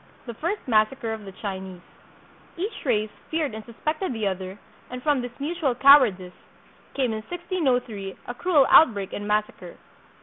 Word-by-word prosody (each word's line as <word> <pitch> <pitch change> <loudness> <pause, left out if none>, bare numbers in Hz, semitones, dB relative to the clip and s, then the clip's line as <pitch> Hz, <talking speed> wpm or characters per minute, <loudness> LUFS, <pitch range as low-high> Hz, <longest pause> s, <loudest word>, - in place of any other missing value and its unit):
The 235 - -6
First 340 - -4
Massacre 225 +1 +1
of 215 -2 -8
the 195 - -8
Chinese 190 -2 -7 0.8
Each 395 +6 -4
race 215 -4 +1 0.2
feared 315 -6 -1
and 220 0 -7
suspected 305 - -3
the 220 -2 -3
other, 190 0 -3 0.3
and 250 0 -7
from 290 -4 +2
this 245 +2 -8
mutual 295 -3 -1
cowardice 240 -10 +5 0.6
came 260 -4 +1
in 220 0 -3
1603 260 - -2
a 245 - -5
cruel 300 0 +3
outbreak 205 -10 +5
and 205 - -5
massacre. 210 0 -2
240 Hz, 155 wpm, -25 LUFS, 210-290 Hz, 0.8 s, cowardice